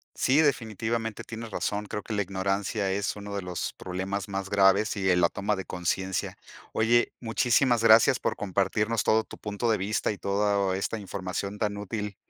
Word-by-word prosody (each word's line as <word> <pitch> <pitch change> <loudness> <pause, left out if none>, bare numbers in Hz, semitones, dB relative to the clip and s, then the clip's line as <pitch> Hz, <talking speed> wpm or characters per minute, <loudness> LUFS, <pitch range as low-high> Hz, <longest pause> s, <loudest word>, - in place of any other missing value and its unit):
Sí, 140 +5 +3
definitivamente, 115 -5 -1
tienes 115 0 -7
razón. 105 +1 -2
Creo 105 - -4
que 110 - -5
la 105 - +1
ignorancia 100 +1 -1
es 100 +2 -1
uno 100 0 -7
de 100 - -2
los 90 -1 -4
problemas 95 +2 -4
más 95 -1 -3
graves 100 +2 +3
y 95 -2 0
en 90 -1 +4
la 85 - +4
toma 105 +1 -1
de 95 - -5
conciencia. 95 +2 -2 0.3
Oye, 120 +2 +2
muchísimas 120 +1 +2
gracias 115 0 +6
por - - -1
compartirnos 105 +3 0
todo 110 0 +3
tu - - -12
punto 105 +2 -1
de 110 - +2
vista 105 +3 0
y 100 - -7
toda 100 -1 +1
esta 105 +3 -2
información 100 +1 -4
tan 105 -1 -1
útil 105 0 -4
100 Hz, 180 wpm, -27 LUFS, 95-110 Hz, 0.3 s, gracias